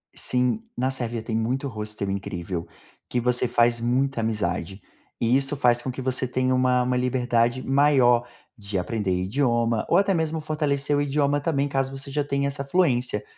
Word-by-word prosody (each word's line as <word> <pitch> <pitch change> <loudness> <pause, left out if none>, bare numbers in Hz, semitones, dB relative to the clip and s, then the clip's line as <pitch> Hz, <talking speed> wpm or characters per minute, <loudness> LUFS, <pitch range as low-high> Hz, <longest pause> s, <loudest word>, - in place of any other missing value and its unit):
Sim, 125 - 0 0.2
na 130 +1 0
Sérvia 120 -3 -3
tem 110 - -3
muito 125 +5 -1
hostel, 105 -3 -5
incrível, 90 -3 -4 0.4
que 125 - 0
você 125 +1 +1
faz 120 0 +2
muita 130 +2 0
amizade, 95 -4 -2 0.4
e 115 +2 +2
isso 135 +1 +1
faz 120 -3 +3
com 130 - -4
que 130 - -6
você 130 0 -1
tenha 130 +1 0
uma 125 -1 +3
uma 125 0 0
liberdade 125 -1 +1
maior 130 -4 +4 0.3
de 100 -2 -4
aprender 100 +1 -2
idioma, 115 0 +1
ou 170 - +4
até 195 0 +3
mesmo 160 -2 -1
fortalecer 150 -2 0
o - - +2
idioma 145 0 +1
também, 145 -2 0
caso 135 0 -1
você 135 +1 -7
já 145 +1 0
tenha 140 0 -1
essa 140 0 -4
fluência. 125 - +1
125 Hz, 175 wpm, -24 LUFS, 115-140 Hz, 0.4 s, maior